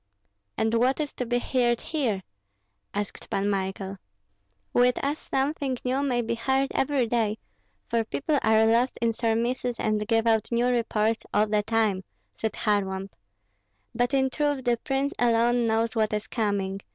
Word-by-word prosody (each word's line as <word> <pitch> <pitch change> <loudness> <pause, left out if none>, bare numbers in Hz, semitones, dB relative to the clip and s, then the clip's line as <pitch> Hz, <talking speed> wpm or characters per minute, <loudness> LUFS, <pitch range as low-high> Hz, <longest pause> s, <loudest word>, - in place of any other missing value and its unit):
"And 220 0 +1
what 250 +5 +2
is 295 -2 -2
to 250 - -4
be 245 +1 +1
heard 240 -1 +1
here?" 235 -12 -1 0.7
asked 205 0 -5
Pan 195 +1 0
Michael. 195 0 -3 0.8
"With 245 0 +4
us 290 +2 -1
something 270 -1 0
new 260 +2 +1
may 250 -4 +1
be 230 +1 -1
heard 265 +4 +1
every 270 -2 +1
day, 220 -2 0 0.5
for 230 -1 +1
people 285 +6 -1
are 220 0 +4
lost 235 +3 +2
in 230 -1 +1
surmises 235 +2 -1
and 210 -1 0
give 225 -1 +2
out 220 -1 +2
new 235 +1 +2
reports 225 -2 0
all 210 +1 +5
the 210 0 +1
time," 215 -3 +1 0.3
said 220 -2 -2
Kharlamp. 195 -2 -1 0.8
"But 245 +4 +1
in 265 -1 +2
truth 290 -2 0
the 240 -1 +2
prince 270 +3 -1
alone 240 0 +3
knows 225 +1 +1
what 220 -1 +1
is 210 0 -1
coming. 200 -4 -1
230 Hz, 160 wpm, -26 LUFS, 215-250 Hz, 0.8 s, all